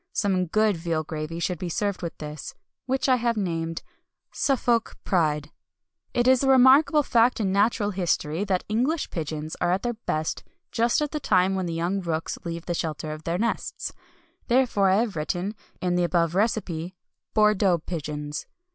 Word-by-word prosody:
Some 185 -3 +1
good 215 +1 +2
veal 165 -1 -1
gravy 155 +2 -5
should 175 -1 -2
be 180 - -3
served 200 +3 -1
with 170 -2 -5
this, 150 -1 -7 0.3
which 265 +1 0
I 255 -1 +5
have 235 -1 0
named 165 -4 -2 0.5
Suffolk 240 -4 +1
Pride. 150 -5 0 0.6
It 240 0 +1
is 260 -1 +5
a - - +2
remarkable 270 +4 +6
fact 240 -1 +3
in 195 -3 0
natural 205 +1 +2
history 175 -2 0
that 190 -3 0
English 255 +10 0
pigeons 155 -1 -4
are 175 - +2
at 185 +2 0
their 240 0 0
best 160 -8 -3 0.3
just 235 +6 +2
at 295 - -3
the 300 - -2
time 190 -6 +3
when 190 -2 -1
the 165 - -3
young 175 +4 -1
rooks 165 -2 -3
leave 170 -1 -5
the 175 - -1
shelter 155 -2 -3
of 155 +1 -8
their 170 +1 0
nests. 230 +4 -2 0.5
Therefore 235 -6 +3
have 205 +1 +2
I - - -2
written, 180 +6 -2 0.3
in 180 -1 0
the 175 0 +2
above 170 -1 +1
recipe, 185 -4 -1 0.4
"Bordeaux" 210 -4 +4
pigeons. 150 -3 -5
185 Hz, 175 wpm, -25 LUFS, 165-225 Hz, 0.6 s, remarkable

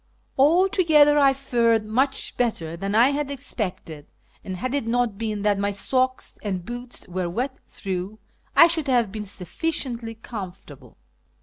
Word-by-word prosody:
Altogether 305 -1 +5
I 275 -1 +6
fared 235 -5 +1
much 265 +6 -1
better 170 -10 -1
than 195 +4 -3
I 235 +4 +6
had 285 0 -2
expected, 185 - -5 0.4
and, 185 -1 -5
had 255 +7 -3
it 280 -5 -1
not 240 -2 +1
been 215 -3 -3
that 205 -1 +2
my 200 0 +1
socks 255 +6 -1
and 185 -4 -3
boots 245 -1 -7
were 180 -1 -3
wet 255 +8 -3
through, 190 +2 -5 0.4
I - - +9
should 325 -3 0
have 240 -6 +2
been 210 0 -5
sufficiently 230 - -4
comfortable. 180 - -9
230 Hz, 145 wpm, -24 LUFS, 195-270 Hz, 0.4 s, I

